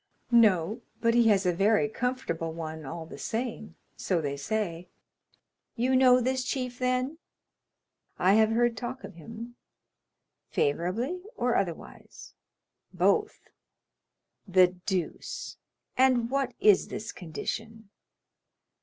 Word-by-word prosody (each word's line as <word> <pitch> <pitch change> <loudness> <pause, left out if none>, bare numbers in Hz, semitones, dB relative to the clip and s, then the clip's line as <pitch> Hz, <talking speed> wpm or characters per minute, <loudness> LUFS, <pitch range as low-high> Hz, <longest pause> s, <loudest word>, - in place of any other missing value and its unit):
"No, 215 -2 +4 0.2
but 230 0 +2
he 235 -1 +5
has 200 -3 +3
a 180 - +3
very 210 +4 +3
comfortable 220 -9 -2
one 160 -2 -6
all 160 +4 -6
the - - -11
same, 225 -1 -4 0.2
so 180 -3 0
they 140 -3 -2
say." 175 +2 -3 0.9
"You 250 +2 +1
know 255 -1 +6
this 260 +1 0
chief, 250 -2 -3
then?" 255 +4 0 1.0
"I 185 +2 +4
have 220 +1 +5
heard 235 +1 +2
talk 255 +2 -6
of - - -9
him." 230 +8 -10 0.9
"Favorably 195 - -1
or 245 0 +1
otherwise?" 175 -4 -5 0.6
"Both." 425 0 0 1.0
"The 185 -1 +5 0.2
deuce!—and 240 +6 -1
what 275 -1 -1
is 205 -3 +5
this 220 - -6
condition?" 220 +5 -6
225 Hz, 110 wpm, -28 LUFS, 180-250 Hz, 1.0 s, know